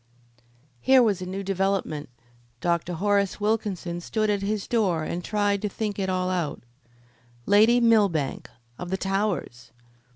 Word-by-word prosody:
Here 260 - +5
was 205 -5 +1
a 180 - -5
new 195 +2 -4
development. 190 -6 -1 0.5
Dr. 170 +2 -1
Horace 200 +2 +1
Wilkinson 205 -5 -2
stood 215 +3 0
at 200 -1 -1
his 205 0 -2
door 190 -9 +1
and 175 +2 -4
tried 205 -1 0
to 210 - -1
think 210 0 -4
it 190 -1 -1
all 185 0 0
out. 170 -9 -2 0.8
Lady 220 +4 +5
Millbank, 205 - +2 0.3
of 180 - -6
the 190 - -1
Towers! 190 - -2
195 Hz, 140 wpm, -25 LUFS, 175-210 Hz, 0.8 s, Here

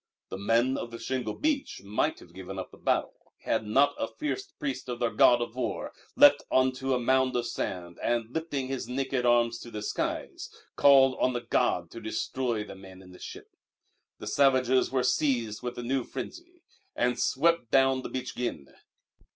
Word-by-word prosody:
The - - -5
Men 115 +6 +2
of 120 - -5
the 115 - -8
Shingle 130 +1 -3
Beach 295 - -1
might 100 +2 0
have - - -16
given 95 +1 -8
up 95 - -6
the - - -15
battle - - -2
had 110 -1 -1
not 140 +6 +4
a - - -1
fierce 390 +6 -4
priest 280 - -5
of 120 - -3
their 120 -2 0
god 120 -1 +5
of 115 - -8
war 115 -6 -3 0.2
leapt - - +7
on 130 0 +3
to 130 0 0
a - - 0
mound 130 +1 +2
of 120 -1 0
sand, 90 -6 -4
and, 120 -1 -1
lifting 145 -4 -3
his 135 -1 -4
naked 130 -1 -1
arms 120 -1 +3
to 120 - -10
the 105 -2 -6
skies, - - -3 0.3
called 135 -2 +6
on 130 - +2
the 120 - -2
god 85 -7 0
to 115 - -9
destroy 110 +1 -2
the 105 - -9
men 95 -1 -13
in 90 - -15
the 90 - -14
ship. - - -10 0.7
The - - -9
savages 130 -2 +3
were 130 -1 +1
seized 120 -5 0
with 125 0 -5
a 120 - -4
new 130 +1 0
frenzy 350 - -8 0.3
and 125 0 0
swept 165 -3 +2
down 135 0 +3
the - - -6
beach 130 -1 -4
again. 75 - -4
125 Hz, 190 wpm, -28 LUFS, 115-135 Hz, 0.7 s, leapt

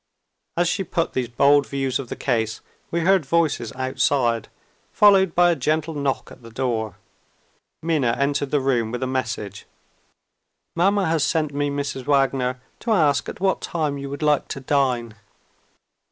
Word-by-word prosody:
As 175 0 +3
she 185 +3 0
put 165 -1 -2
these 125 -2 -1
bold 140 +3 +4
views 135 -2 -1
of 135 - -6
the - - -4
case, 110 -4 -1 0.3
we 170 - -1
heard 190 0 +3
voices 145 -6 0
outside, 130 -3 0 0.4
followed 195 -4 +5
by 175 0 +5
a - - +1
gentle 155 +3 -1
knock 140 -2 -2
at - - -14
the 115 - -12
door. 115 -5 -2 0.9
Minna 150 -8 +1
entered 140 0 0
the 145 0 +1
room 120 -4 0
with 125 +1 -3
a - - +1
message. 115 -6 -4 1.1
"Mamma 195 +3 +2
has 160 -3 +1
sent 155 -3 0
me, 145 0 0
Mrs. 140 -2 -4
Wagner, 135 -3 +1 0.2
to - - -6
ask 155 -9 +2
at - - -8
what 190 0 +1
time 150 -4 -2
you 140 0 -6
would 140 +2 -5
like 150 -1 +2
to 140 - -5
dine." 130 -4 0
140 Hz, 165 wpm, -23 LUFS, 125-160 Hz, 1.1 s, followed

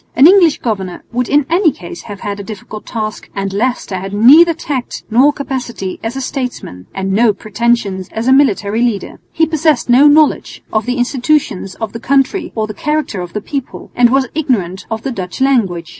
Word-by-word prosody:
An 265 - +6
English 350 -3 +6
governor 195 -6 -3
would 245 0 -2
in 290 -1 +3
any 340 0 +3
case 345 +5 -10
have 200 -1 -8
had 205 0 -4
a - - -5
difficult 215 0 -9
task, 215 -2 -5
and 195 -1 -3
Leicester 220 -2 -1
had 195 +2 -6
neither 295 +11 +7
tact 275 -6 -4
nor 260 +6 +5
capacity 255 -9 -5
as 225 +3 -4
a 270 - -3
statesman, 250 - -5
and 195 0 -2
no 220 +1 +4
pretensions 210 -2 -1
as 225 +2 -3
a 260 - +5
military 225 -5 +2
leader. 230 -5 -2
He 325 - +2
possessed 315 -3 +1
no 270 +4 +7
knowledge 300 0 +2
of 215 +2 0
the 250 +1 -1
institutions 245 -6 0
of 225 -2 -5
the 230 - -6
country 275 - 0
or 220 -1 0
the 215 - -7
character 300 -6 -2
of 175 -1 -8
the 210 - -3
people, 275 +3 -6
and 245 -1 +5
was 265 +1 +2
ignorant 220 - -2
of 220 -1 -4
the 270 - -2
Dutch 185 -6 -6
language. 210 - +1
240 Hz, 195 wpm, -15 LUFS, 200-275 Hz, -, neither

